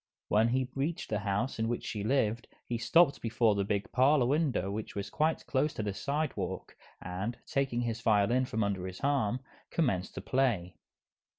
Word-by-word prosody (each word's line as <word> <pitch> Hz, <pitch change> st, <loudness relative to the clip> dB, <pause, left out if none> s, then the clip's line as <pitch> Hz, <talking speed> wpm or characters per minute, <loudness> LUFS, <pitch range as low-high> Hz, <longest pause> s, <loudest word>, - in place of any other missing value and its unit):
When 110 Hz, +2 st, +4 dB
he 130 Hz, +2 st, +1 dB
reached 145 Hz, +1 st, -2 dB
the 105 Hz, -, +1 dB
house 105 Hz, +5 st, -1 dB
in 110 Hz, -, +1 dB
which 120 Hz, +1 st, -2 dB
she 105 Hz, -2 st, -3 dB
lived, 115 Hz, -1 st, +1 dB, 0.2 s
he 120 Hz, -1 st, -3 dB
stopped 145 Hz, +4 st, +4 dB
before 115 Hz, -1 st, +2 dB
the 100 Hz, -1 st, 0 dB
big 100 Hz, 0 st, -2 dB
parlor 135 Hz, +1 st, +4 dB
window 130 Hz, -, +1 dB
which 110 Hz, +1 st, -5 dB
was 100 Hz, -1 st, -4 dB
quite 155 Hz, +1 st, 0 dB
close 145 Hz, +2 st, 0 dB
to 110 Hz, -, -2 dB
the 100 Hz, -1 st, -2 dB
sidewalk, 110 Hz, -, -3 dB, 0.2 s
and, 95 Hz, +6 st, -4 dB
taking 135 Hz, -5 st, 0 dB
his 115 Hz, -1 st, -2 dB
violin 115 Hz, +4 st, +3 dB
from 110 Hz, -3 st, -1 dB
under 95 Hz, -2 st, -1 dB
his 95 Hz, 0 st, -8 dB
arm, 130 Hz, -4 st, +1 dB, 0.3 s
commenced 105 Hz, -, 0 dB
to -, -, -4 dB
play. 120 Hz, -10 st, 0 dB
115 Hz, 180 wpm, -31 LUFS, 100-135 Hz, 0.3 s, When